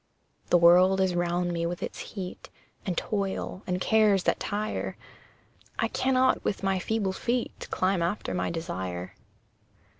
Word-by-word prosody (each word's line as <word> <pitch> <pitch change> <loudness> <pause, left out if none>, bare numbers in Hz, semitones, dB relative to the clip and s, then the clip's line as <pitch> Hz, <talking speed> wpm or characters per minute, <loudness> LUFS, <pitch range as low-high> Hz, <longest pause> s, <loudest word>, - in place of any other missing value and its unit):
The 175 - +6
world 180 +3 +6
is 190 -1 +2
round 175 0 0
me 170 0 -1
with 175 0 -4
its - - -5
heat, 185 -3 -7 0.4
And 180 -3 -1
toil, 195 -2 -2
and 180 -1 0
cares 210 -2 +4
that - - +1
tire; 210 +1 -3 0.8
I - - +1
cannot 260 0 +2
with 200 - -2
my 190 -1 +1
feeble 200 0 -1
feet 240 +4 -2
Climb 185 -1 +1
after 175 +5 -1
my 180 - -1
desire. 95 - -4
185 Hz, 145 wpm, -28 LUFS, 175-205 Hz, 0.8 s, The